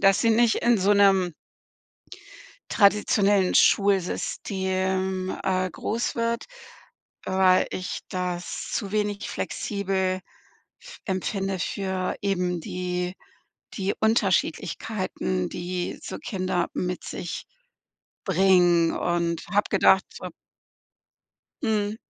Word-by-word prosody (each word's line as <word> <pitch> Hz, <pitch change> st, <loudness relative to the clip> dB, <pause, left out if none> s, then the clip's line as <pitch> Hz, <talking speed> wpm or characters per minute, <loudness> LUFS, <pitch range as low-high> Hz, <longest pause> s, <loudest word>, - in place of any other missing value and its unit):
dass 195 Hz, 0 st, +4 dB
sie 230 Hz, -, +3 dB
nicht 230 Hz, 0 st, +4 dB
in 235 Hz, -3 st, +3 dB
so 200 Hz, +2 st, +3 dB
'nem 195 Hz, -3 st, +4 dB, 1.4 s
traditionellen 200 Hz, -1 st, +3 dB
Schulsystem, 190 Hz, -1 st, +1 dB
äh, 185 Hz, -1 st, 0 dB
groß 230 Hz, +8 st, -2 dB
wird. 230 Hz, 0 st, -1 dB, 0.8 s
Weil 190 Hz, -1 st, +3 dB
ich 185 Hz, -, -4 dB
das 180 Hz, -1 st, -4 dB
zu 195 Hz, -, -2 dB
wenig 205 Hz, -1 st, -1 dB
flexibel 190 Hz, -2 st, -2 dB, 0.6 s
f -, -, -12 dB
empfinde 195 Hz, 0 st, -2 dB
für 190 Hz, 0 st, -2 dB
eben 180 Hz, -3 st, 0 dB
die 180 Hz, +1 st, -3 dB, 0.6 s
die 195 Hz, -1 st, -1 dB
Unterschiedlichkeiten, 185 Hz, -3 st, 0 dB
die 175 Hz, 0 st, -4 dB
so -, -, -6 dB
Kinder 185 Hz, -3 st, -2 dB
mit 180 Hz, 0 st, -3 dB
sich 175 Hz, -, -5 dB, 0.8 s
bringen. 180 Hz, -3 st, +4 dB
Und 170 Hz, -1 st, -1 dB
habe 205 Hz, 0 st, +2 dB
gedacht, 190 Hz, -1 st, +4 dB
so -, -, -7 dB, 1.4 s
Mhm. 215 Hz, -2 st, 0 dB
190 Hz, 95 wpm, -25 LUFS, 180-205 Hz, 1.4 s, dass